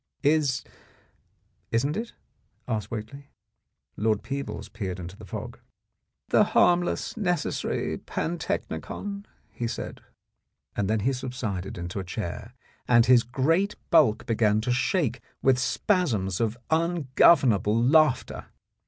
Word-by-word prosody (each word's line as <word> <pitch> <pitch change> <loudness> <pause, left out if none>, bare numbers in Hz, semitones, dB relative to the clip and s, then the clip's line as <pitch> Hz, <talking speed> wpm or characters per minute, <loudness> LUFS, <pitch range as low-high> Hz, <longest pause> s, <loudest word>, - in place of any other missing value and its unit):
" - - -41
Is— 140 -5 -1 1.1
isn't 135 +6 0
it? 230 +3 -4 0.3
" - - -43
asked 110 -4 -2
Whately. 115 +5 -7 0.7
Lord 110 0 0
Peebles 105 -7 -5
peered 95 -3 -5
into 90 +2 -7
the - - -12
fog. - - -7 0.7
"The - - +5
harmless, 175 0 +2
necessary 180 -8 -1
pantechnicon," 200 +4 -4 0.3
he 120 - -3
said. - - -6 0.7
Then 105 +2 0
he 135 +6 +1
subsided 120 -8 -4
into 90 +3 -4
a - - -3
chair 105 +5 -6 0.3
and 120 -1 +5
his 125 -2 +6
great 160 - +1 0.2
bulk 150 -10 +4
began 110 -2 +2
to 125 - -1
shake 130 - 0 0.2
with 130 -1 +4
spasms 125 - 0
of 115 0 0
ungovernable 140 - +3
laughter. 135 +2 +3
125 Hz, 120 wpm, -26 LUFS, 105-155 Hz, 1.1 s, his